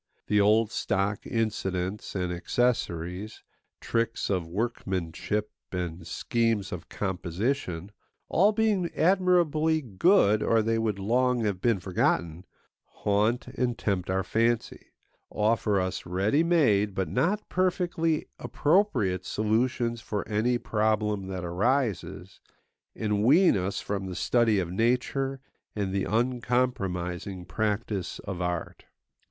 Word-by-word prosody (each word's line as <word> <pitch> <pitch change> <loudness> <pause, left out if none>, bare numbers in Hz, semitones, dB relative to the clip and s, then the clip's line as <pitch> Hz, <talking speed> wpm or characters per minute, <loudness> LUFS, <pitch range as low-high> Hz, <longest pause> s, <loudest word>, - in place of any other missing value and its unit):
The 105 -1 +3
old 110 +2 +3
stock 100 0 -1
incidents 100 -4 -2
and 90 -2 -1
accessories, 90 -1 -1 0.4
tricks 115 -2 -1
of 90 -4 -1
workmanship 100 0 -2 0.2
and 90 -2 -4
schemes 115 -5 0
of 90 -2 -7
composition 95 - -2 0.4
(all 200 +5 +4
being 210 -5 +1
admirably 170 -4 +3
good, 110 - +3
or 115 -1 +3
they 115 +1 +1
would 110 -3 -1
long 125 +5 +1
have 100 -4 -1
been 115 -5 +2
forgotten) 90 -2 0 0.4
haunt 105 +4 0
and 125 -2 -1
tempt 95 -4 -1
our 95 +1 +1
fancy, 115 +4 0 0.4
offer 105 -1 +1
us 95 -1 -3
ready 100 - +2
made 110 - +3
but 95 - -1
not 185 +11 0
perfectly 175 -3 0
appropriate 135 - +1
solutions 115 +3 0
for 105 -2 -4
any 115 +3 +1
problem 105 -3 0
that 95 -2 -4
arises, 110 +5 -1 0.6
and 105 -2 0
wean 160 - +5
us 95 +1 -1
from 100 -2 -3
the 90 - -5
study 115 -1 +2
of 90 -3 -1
nature 125 +5 0 0.3
and 100 -3 -2
the 100 -1 0
uncompromising 100 -7 -1
practice 105 -2 -2
of 95 -2 -4
art. 90 -1 -3
105 Hz, 115 wpm, -27 LUFS, 95-125 Hz, 0.6 s, wean